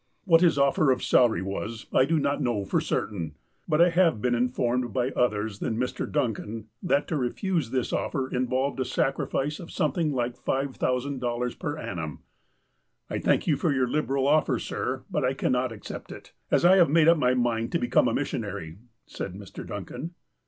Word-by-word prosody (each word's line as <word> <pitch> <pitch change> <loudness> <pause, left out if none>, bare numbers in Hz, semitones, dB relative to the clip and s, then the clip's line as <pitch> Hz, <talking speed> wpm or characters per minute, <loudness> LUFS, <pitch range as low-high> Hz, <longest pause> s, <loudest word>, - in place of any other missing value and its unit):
What 165 -3 +5
his 170 -4 +4
offer 140 +1 +3
of 130 - +2
salary 110 -8 +3
was, 105 +4 -5
I 130 - +5
do 165 +3 +1
not 145 -1 0
know 110 -5 0
for - - +1
certain, 80 -7 -3 0.3
but 155 -1 +1
I 175 +1 +6
have 165 -8 +3
been 125 +3 +1
informed, 125 -1 0
by 125 +1 0
others 110 -5 0
than 110 - -2
Mr. 125 +1 -2
Duncan, 115 -5 -2
that 160 -6 +1
to 165 - -1
refuse 150 - -1
this 130 -1 -1
offer 130 -1 -1
involved 130 +2 -1
a - - +2
sacrifice 135 +3 -1
of 170 - -9
something 155 +1 0
like 125 -2 -3
$5,000 125 -2 -1
per 145 +1 -3
annum. 80 - -5 0.3
' - - -45
' - - -49
I - - -1
thank - - +2
you 155 - +3
for 155 +3 0
your 130 -2 +1
liberal 135 0 0
offer, 145 -3 +3
sir; 130 +3 -3
but - - 0
I 130 +1 +1
cannot 125 -2 0
accept 110 - -8
it, - - -11 0.2
as - - +3
I 185 +2 +7
have 175 -5 +5
made 160 +1 +4
up 165 -1 +6
my 125 -2 +3
mind 115 -2 0
to - - +3
become 120 - +2
a - - 0
mis - - -1
sionary," 80 +1 -5 0.3
said 95 - -6
Mr. 100 -1 -9
Duncan. 170 +4 -7
130 Hz, 195 wpm, -27 LUFS, 120-145 Hz, 0.3 s, I